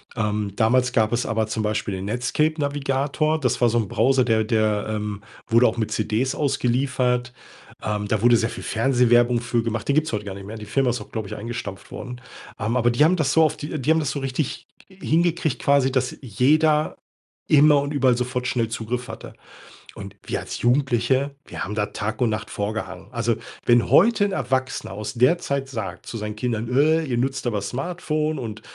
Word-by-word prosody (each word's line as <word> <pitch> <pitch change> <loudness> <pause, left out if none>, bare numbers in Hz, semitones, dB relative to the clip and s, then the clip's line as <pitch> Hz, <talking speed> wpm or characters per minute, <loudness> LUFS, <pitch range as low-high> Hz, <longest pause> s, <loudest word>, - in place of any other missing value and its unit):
Ähm, 105 -3 -1
damals 125 +3 +2
gab 110 -3 +2
es 120 - 0
aber 110 -1 0
zum 110 0 -2
Beispiel 105 -1 -1
den 95 +1 -5
Netscape 125 +8 0
Navigator. 145 +2 0
Das 125 -5 0
war 120 - +4
so 115 - +1
'n 110 - -1
Browser, 130 +4 +3
der 110 -3 +2
der, 110 -1 +1
ähm, 105 -1 -3 0.3
wurde 115 +2 +5
auch 110 - -1
mit 110 -2 -2
CDs 110 +4 0
ausgeliefert. 125 -2 0 0.5
Ähm, 105 -1 -2
da 105 0 0
wurde 120 +1 +6
sehr 115 +1 0
viel - - -8
Fernsehwerbung 120 0 +3
für 120 -1 0
gemacht. 115 0 -3
Den 140 - +2
gibt's 155 +1 +1
heute 105 -1 -2
gar 100 - -5
nicht 100 0 -9
mehr. 110 +2 -7
Die 105 - -8
Firma 130 +5 +1
ist 120 - -3
auch, - - -12
glaube 110 -3 -4
ich, - - -6
eingestampft 105 -3 -6
worden. 125 0 -7 0.4
Ähm, 110 +4 -1
aber 120 -1 +3
die 120 +5 +3
haben 170 +4 +4
das 150 -6 +1
so 160 - +5
auf 155 - +1
die 150 +1 -5
die 135 +4 +1
haben 160 - +4
das 145 -4 -1
so 140 - -3
richtig 135 +1 -3 0.2
hingekriegt 170 -5 0
quasi, 140 -2 +3
dass 130 -1 0
jeder 150 +6 +2 0.5
immer 150 -1 +6
und 145 +1 -3
überall 130 -4 +3
sofort 125 0 -2
schnell 120 -3 0
Zugriff 115 +2 -4
hatte. - - -8 0.6
Und 100 -1 -9
wir - - -1
als - - -6
Jugendliche, 130 +1 +2
wir - - -6
haben 105 - -4
da 105 -1 0
Tag 105 +5 -4
und 120 - +3
Nacht 110 0 -4
vor 100 +1 -2
gehangen. 95 -2 -6
Also, 115 -1 0 0.3
wenn 120 -1 +4
heute 205 +2 +5
'n 200 - -1
Erwachsener 130 - -2
aus 105 +1 -5
der 130 +9 +4
Zeit 140 -4 -2
sagt 110 -8 -6
zu 115 - -6
seinen 105 -1 -5
Kindern: 115 0 -2
„Äh, 160 +3 +4
ihr 125 -4 -2
nutzt 130 +1 -1
aber 105 -4 -1
Smartphone 155 - -2
und, 110 -4 -6
125 Hz, 205 wpm, -23 LUFS, 110-140 Hz, 0.6 s, wurde